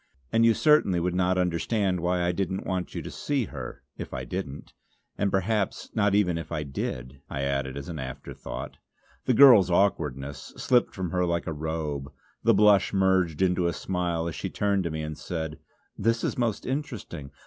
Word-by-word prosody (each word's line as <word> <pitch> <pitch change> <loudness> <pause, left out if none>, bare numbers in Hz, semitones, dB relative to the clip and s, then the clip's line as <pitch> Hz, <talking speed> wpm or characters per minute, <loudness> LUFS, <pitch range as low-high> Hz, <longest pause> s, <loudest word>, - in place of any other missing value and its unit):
And 115 - +4
you 115 -1 +5
certainly 150 - +4
would 90 +1 0
not 90 0 +2
understand 90 +2 0
why 90 +1 0
I 85 - +2
didn't 95 +1 -2
want 90 -1 -1
to - - -6
see 140 -5 -1
her, 65 -9 -8 0.2
if - - -6
I 65 - -4
didn't. 65 +3 -6 0.4
And 100 - +1
perhaps 95 +1 -1
not 105 -2 +2
even 90 -5 +2
if 80 -1 -8
I 75 -2 -2
did," 65 -1 -5
I 70 0 -3
added 70 -1 -1
as 70 - -6
an 80 -3 -5
afterthought. 65 -1 -7 0.5
The 125 - +3
girl's 120 -8 +8
awkwardness 75 -7 0
slipped 125 -1 +2
from 90 -3 -3
her 90 -1 +1
like 85 -1 0
a 80 - -3
robe; 75 -3 -3 0.3
the 115 -1 +5
blush 105 -1 +5
merged 95 -4 +2
into 90 -1 +2
a 85 - 0
smile 85 -2 -2
as 85 - -3
she - - -4
turned 100 -2 0
to - - 0
me 80 0 -4
and 75 0 -4
said: 80 -1 -5 0.4
"This 115 +2 0
is - - 0
most 115 -4 -1
interesting. 125 - -4
90 Hz, 185 wpm, -27 LUFS, 75-100 Hz, 0.5 s, girl's